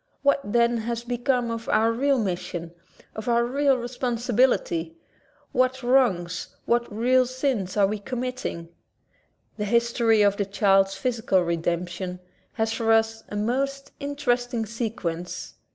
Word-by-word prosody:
What, 280 Hz, 0 st, +4 dB
then, 235 Hz, +2 st, +2 dB
has 235 Hz, +1 st, -3 dB
become 245 Hz, 0 st, 0 dB
of 230 Hz, 0 st, -5 dB
our 225 Hz, +1 st, +3 dB
real 275 Hz, +4 st, +2 dB
mission, 175 Hz, -5 st, -3 dB, 0.4 s
of 220 Hz, +2 st, -4 dB
our 235 Hz, 0 st, +3 dB
real 275 Hz, +2 st, +2 dB
responsibility? 240 Hz, -8 st, 0 dB, 0.6 s
What 255 Hz, +1 st, +2 dB
w^rongs, 240 Hz, -9 st, +1 dB, 0.2 s
what 235 Hz, -1 st, +1 dB
real 250 Hz, +4 st, +3 dB
sins 255 Hz, -7 st, -2 dB
are 200 Hz, -, +5 dB
we 210 Hz, +2 st, -2 dB
committing? 250 Hz, -7 st, -4 dB, 0.9 s
The 210 Hz, -, -2 dB
history 235 Hz, 0 st, +3 dB
of 200 Hz, 0 st, +3 dB
the 200 Hz, -, 0 dB
child's 195 Hz, -1 st, +3 dB
physical 225 Hz, -3 st, +1 dB
redemp 170 Hz, +1 st, -1 dB
tion 180 Hz, +1 st, -5 dB, 0.3 s
has 225 Hz, 0 st, 0 dB
for 225 Hz, -1 st, +1 dB
us 225 Hz, 0 st, +2 dB
a -, -, -6 dB
most 275 Hz, +6 st, -1 dB
interesting 245 Hz, -5 st, -1 dB
sequence. 200 Hz, -7 st, -4 dB
230 Hz, 135 wpm, -25 LUFS, 200-250 Hz, 0.9 s, are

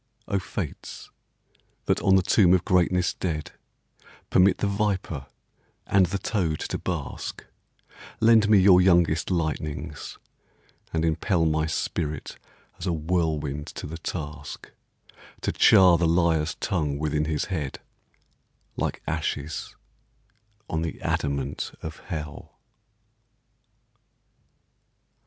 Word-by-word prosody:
O 100 Hz, -2 st, 0 dB
Fates 80 Hz, -, -6 dB, 0.7 s
that -, -, +1 dB
on 95 Hz, -, +4 dB
the 95 Hz, -, +4 dB
tomb 95 Hz, 0 st, +5 dB
of 90 Hz, -, -1 dB
greatness 90 Hz, 0 st, +2 dB
dead 80 Hz, -4 st, -3 dB, 0.8 s
Permit 95 Hz, +1 st, +5 dB
the -, -, -1 dB
viper 100 Hz, -8 st, -1 dB, 0.6 s
and 95 Hz, -2 st, +4 dB
the 100 Hz, +3 st, -2 dB
toad 90 Hz, -5 st, -1 dB
to -, -, -3 dB
bask, -, -, -5 dB, 0.7 s
Lend 110 Hz, -1 st, +5 dB
me 105 Hz, -, +7 dB
your 95 Hz, -1 st, +7 dB
youngest 85 Hz, -4 st, +3 dB
lightnings, 80 Hz, -4 st, -3 dB, 0.7 s
and 80 Hz, 0 st, 0 dB
impel 80 Hz, +2 st, +1 dB
My 80 Hz, 0 st, +1 dB
spirit 80 Hz, -1 st, -3 dB, 0.4 s
as -, -, -4 dB
a -, -, +2 dB
whirlwind 75 Hz, -3 st, -1 dB
to -, -, -7 dB
the 80 Hz, +3 st, -7 dB
task 75 Hz, -4 st, -6 dB, 0.7 s
To -, -, 0 dB
char 90 Hz, -3 st, +6 dB
the 85 Hz, -, +3 dB
liar's 80 Hz, -2 st, +2 dB
tongue 75 Hz, -9 st, -1 dB
within 75 Hz, 0 st, 0 dB
his 75 Hz, -2 st, -1 dB
head 75 Hz, -6 st, -3 dB, 0.5 s
— -, -, -44 dB
Like -, -, -3 dB
ashes 80 Hz, -1 st, -3 dB, 0.9 s
on 80 Hz, -, -2 dB
the 80 Hz, -2 st, -4 dB
adamant 70 Hz, -1 st, -2 dB
of 80 Hz, 0 st, -6 dB
Hell! 75 Hz, -5 st, -7 dB
80 Hz, 115 wpm, -26 LUFS, 75-90 Hz, 0.9 s, me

